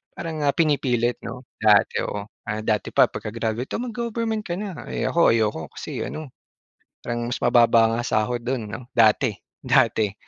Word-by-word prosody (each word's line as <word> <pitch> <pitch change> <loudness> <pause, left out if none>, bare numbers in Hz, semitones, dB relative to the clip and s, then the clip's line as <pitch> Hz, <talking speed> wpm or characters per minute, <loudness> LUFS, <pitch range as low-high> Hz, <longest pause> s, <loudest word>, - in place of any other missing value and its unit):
parang 160 -2 -5
ah 140 -1 +1
pinipilit 130 -6 +1
'no 125 +3 -8 0.2
dati, 105 -1 +4
oo. 105 0 -4 0.4
Dati 105 -2 0
pa - - +5
pagka-graduate, 115 +3 -4
"Oh, 240 - -3
mag-government 230 -2 -2
ka 175 -3 -4
na", 200 -2 -6
eh - - -2
ako 170 0 +4
ayoko 110 -7 +1
kasi - - -6
ano 155 -5 -6 0.7
parang 120 0 -3
mas - - -3
mababa 115 -2 +5
ang 120 - -2
sahod 120 +3 0
do'n 120 -4 -2
'no 110 +3 -6
dati, 115 +2 +4 0.3
dati, 105 -3 +3
120 Hz, 160 wpm, -23 LUFS, 110-155 Hz, 0.7 s, pa